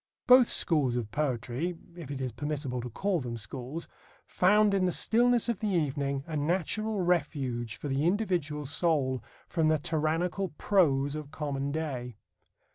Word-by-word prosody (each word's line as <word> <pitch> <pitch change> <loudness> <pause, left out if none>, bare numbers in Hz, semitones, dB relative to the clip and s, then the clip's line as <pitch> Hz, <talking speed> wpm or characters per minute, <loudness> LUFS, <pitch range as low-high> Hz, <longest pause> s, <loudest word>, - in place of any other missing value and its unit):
Both 250 -1 +7
schools 145 -8 +2
of 115 -4 -3
poetry 135 +5 -2 0.2
(if 165 -6 -9
it 140 -2 -4
is 130 -2 -2
permissible 140 0 -3
to 125 - -6
call 190 - -1
them 120 -4 -5
schools) 130 +9 -6 0.4
found 210 +2 +3
in 190 -2 +2
the 180 - +2
stillness 240 +4 +3
of 235 -4 -1
the 215 - -1
evening 140 -5 -1
a 160 - -5
natural 190 +7 0
refuge 140 -9 -1
for - - -6
the 135 +1 0
individual 170 -6 0
soul 140 -4 +1 0.2
from 160 -3 +1
the 155 0 +3
tyrannical 165 +5 -1
prose 145 -8 +2
of 155 -2 -6
common 140 -2 -3
day. 135 -6 -4
150 Hz, 155 wpm, -29 LUFS, 135-180 Hz, 0.4 s, Both